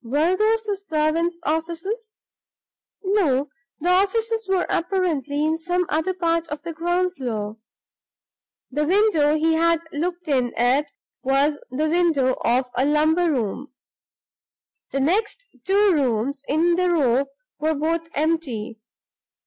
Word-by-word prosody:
Were 300 +9 +1
these 440 +2 +2
the 415 -2 -1
servants' 335 -2 0
offices? 340 - -3 0.9
No; 310 -9 +1 0.3
the 340 +3 -1
offices 440 +4 +1
were 380 -2 +2
apparently 310 -6 0
in 320 +1 0
some 355 +2 0
other 320 +5 0
part 335 -2 0
of 295 -1 -6
the 335 -1 -5
ground 350 +3 0
floor; 220 -6 -4 1.1
the 300 - 0
window 330 -5 +3
he 320 +1 +2
had 335 0 +2
looked 345 +3 -3
in 255 -5 0
at 265 +5 +2 0.3
was 280 +3 +1
the 290 +5 -1
window 310 -6 +2
of 245 +3 +2
a 250 - +2
lumber 310 +4 +2
room. 260 +1 -3 1.1
The 275 - -1
next 415 - 0 0.2
two 400 +1 +3
rooms 265 -1 0
in 340 +4 +2
the 365 0 +2
row 275 -6 +2 0.3
were 310 +1 +1
both 330 +3 -1
empty. 275 -8 -2
320 Hz, 130 wpm, -23 LUFS, 280-360 Hz, 1.1 s, window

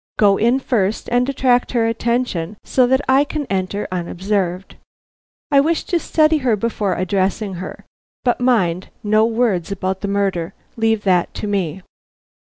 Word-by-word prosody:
Go 200 -2 +4
in 235 +4 +3
first 220 -6 -1
and 245 +2 +2
attract 255 -3 +1
her 235 -2 +2
attention 230 -5 -1
so 255 -2 +2
that 265 +2 +2
I 265 +2 +5
can 295 0 -4
enter 195 +2 -2
unobserved. 185 +1 -2 0.7
I 280 - +6
wish 320 +4 +1
to 345 - 0
study 315 -1 +2
her 250 -6 +1
before 205 -3 -1
addressing 190 +2 -1
her; 185 - -8 0.4
but, 245 -1 +1
mind, 190 -8 +1
no 215 +1 +3
words 225 -6 0
about 190 -1 -3
the 200 - -2
murder; 195 -3 -1 0.2
leave 225 -2 +1
that 180 -3 +1
to - - -4
me." 190 -3 -2
210 Hz, 155 wpm, -19 LUFS, 190-245 Hz, 0.7 s, I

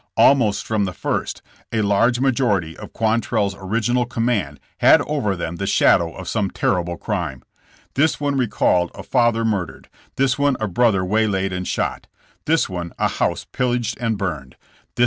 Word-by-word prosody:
Almost 115 -7 +4
from 105 -2 0
the 95 - -4
first, - - -3 0.3
a 110 -2 0
large 110 +5 +2
major 130 -5 +2
ity 80 -2 -7
of - - -10
QuantrelFs 110 -3 0
original 115 +5 -1
command 115 - -1 0.2
had - - +6
over 135 -10 -1
them 85 -1 -5
the 100 - -3
shadow 85 -4 +3
of 95 -2 -8
some 105 -4 -1
terrible 85 -2 -1
crime. 85 - -4 0.5
This 155 +4 +2
one 145 -1 -1
re 130 -3 +1
called 90 -4 +1
a - - -8
father 120 -3 +2
murdered, 100 -5 -3 0.3
this 135 0 +1
one 140 -2 +2
a 110 - -1
brother 100 -2 +2
waylaid 95 -2 0
and 90 0 -4
shot, - - -2 0.4
this 165 +2 +2
one 85 -3 -5
a - - +2
house - - -1
pillaged 125 -2 -1
and 115 -3 -1
burned, 75 -10 -4
this - - -32
The - - -36
border - - -32
wars. - - -10
105 Hz, 185 wpm, -21 LUFS, 95-120 Hz, 0.5 s, had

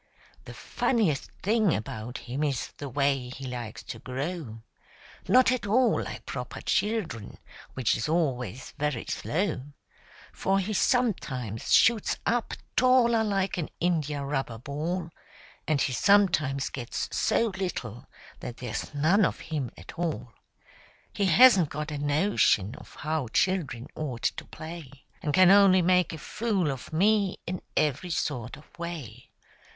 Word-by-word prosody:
The - - -9
funniest 200 - 0
thing 215 -2 +3
about 110 +3 -5
him 130 +5 -3
is 140 -4 -1
the 145 - -6
way 135 -1 0
he 130 +1 -8
likes 120 -4 -6
to 115 - -7
grow— 130 -2 -5 0.6
Not 255 0 +5
at 255 -5 -1
all 245 +4 +3
like - - -7
proper - - -6
children, 185 - -1 0.4
which 130 -3 +2
is 110 +6 -2
always 130 - -1
very 145 -5 -1
slow; 180 -4 -1 0.7
For 195 0 +1
he 195 +2 -1
sometimes 145 - 0
shoots 230 -3 +4
up 240 0 0 0.2
taller 245 -3 +4
like 195 -3 0
an 160 - -3
india 150 -5 0
rubber 135 -5 -2
ball, 160 +7 -4 0.6
And 155 -3 +2
he 135 - +1
sometimes 160 - +3
gets 120 -3 -4
so 230 - +2
little 125 - -4 0.3
that 120 - -7
there's 120 +3 -5
none 165 +9 +4
of - - 0
him 140 -6 -1
at - - -11
all. 160 -9 -3 0.8
He 200 - 0
hasn't 190 - +7
got 150 +1 -4
a 150 - -4
notion 145 - +2
of - - -13
how 155 -4 -2
children 140 -4 0
ought 130 -7 -5
to - - -7
play, 160 -2 -8 0.3
And 155 -5 -1
can 185 +4 +6
only 195 -2 +6
make 180 0 +3
a 160 - -6
fool 195 -2 -1
of 135 -2 -7
me 200 +3 +2
in 180 +1 -4 0.2
every 150 +4 +1
sort 125 -8 -2
of 150 - -16
way. 150 -10 -7
155 Hz, 145 wpm, -27 LUFS, 130-195 Hz, 0.8 s, hasn't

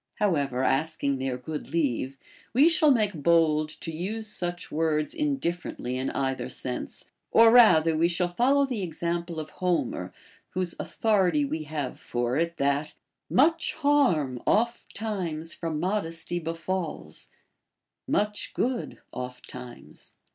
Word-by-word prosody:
How 205 -3 +2
ever, 135 -4 -1
asking 140 -1 0
their 130 -1 -2
good 150 +4 -6
leave, 135 -4 -1 0.4
we 280 +7 +6
shall 310 -2 +4
make 215 -6 +3
bold 155 -1 +3
to 165 - -4
use 200 +8 -4
such 175 -4 -4
words 155 -1 0
indifferently 220 - -2
in 130 +1 -1
either 135 -1 -2
sense; 60 - -4 0.2
or 230 0 +7
rather 165 -10 +6
we 165 +2 +3
shall 175 +1 0
follow 255 +10 +3
the 250 -6 -3
example 170 -1 -3
of 155 -1 -6
Homer, 180 -2 -1 0.4
whose 185 -2 -1
authority 185 -9 +2
we 155 +2 -3
have 150 -2 -4
for 120 +1 -2
it, 170 +2 0
that 140 +2 0 0.3
Much 320 +5 +3
harm 255 - +2
oft 235 +2 +1
times 175 -7 -3
from 160 -3 -3
modesty 175 -2 -1
befalls, 165 - -4 0.8
Much 210 0 -1
good 250 -1 -2
oft 125 0 -6
times. 125 -1 -11
165 Hz, 135 wpm, -27 LUFS, 150-210 Hz, 0.8 s, or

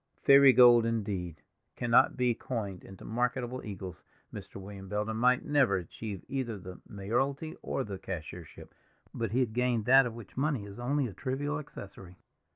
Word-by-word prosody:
Fairy 140 -1 +8
gold, 120 -1 +7
indeed, 100 -8 -3 0.3
cannot 120 +2 +3
be 125 -1 +2
coined 105 -7 -5
into 95 -1 -12
marketable 125 +2 -2
eagles. 95 -4 -8 0.3
Mr. - - -9
William 95 0 -9
Belden 105 +2 -2
might 125 +2 +2
never 140 -8 +3
achieve 95 +2 -6
either 130 -5 -3
the 90 -1 -10
mayoralty 135 +10 -2
or 135 - -2
the 100 -5 -7
cashiership, 85 -2 -8 0.4
but 115 -2 -2
he 125 +6 +1
had 115 -4 -1
gained 120 -2 0
that 135 +1 +6
of 115 - -7
which 115 -4 -12
money 135 -5 -1
is 100 +2 -10
only 135 +3 0
a 110 - -5
trivial 145 - -3
accessory. 95 -10 -11
115 Hz, 165 wpm, -30 LUFS, 100-130 Hz, 0.4 s, Fairy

